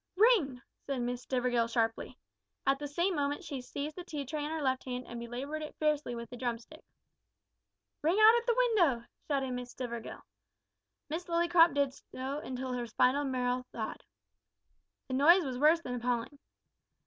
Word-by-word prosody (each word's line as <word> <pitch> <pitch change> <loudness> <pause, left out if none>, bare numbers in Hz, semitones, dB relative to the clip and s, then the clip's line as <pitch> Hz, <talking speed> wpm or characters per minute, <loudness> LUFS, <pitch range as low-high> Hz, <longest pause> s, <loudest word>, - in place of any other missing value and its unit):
"Ring!" 375 - +4 0.2
said 275 -2 -4
Miss 245 0 -2
Stivergill 245 -3 +1
sharply. 225 -1 -1 0.5
At 275 0 +2
the 290 - -4
same 345 +6 0
moment 290 0 -1
she 275 -3 -5
seized 285 +4 -5
the 360 - -6
tea 300 -5 -5
tray 295 +2 -3
in 295 - -3
her 320 0 -2
left 260 -1 +1
hand 250 -1 -4
and 235 - -7
belaboured 255 +6 -5
it 305 - -7
furiously 300 -5 0
with 235 0 -6
the 245 - -7
drumstick. 240 +5 -5 1.2
"Ring 330 +6 +2
out 435 +2 +9
at 475 0 0
the 475 - +3
window!" 355 - +3 0.2
shouted 270 -3 0
Miss 250 0 -4
Stivergill. 235 -3 -6 0.8
Miss 325 +4 -4
Lillycrop 340 -1 +5
did 280 -2 +2
so 265 +2 -6
until 260 -2 -4
her 245 -1 -3
spinal 255 +5 +2
marrow 250 -1 0
thawed. 220 -2 -5 1.0
The 260 - -5
noise 325 +7 +6
was 255 -2 -3
worse 315 +4 +5
than 250 - -5
appalling. 245 +3 -2
275 Hz, 170 wpm, -32 LUFS, 250-310 Hz, 1.2 s, out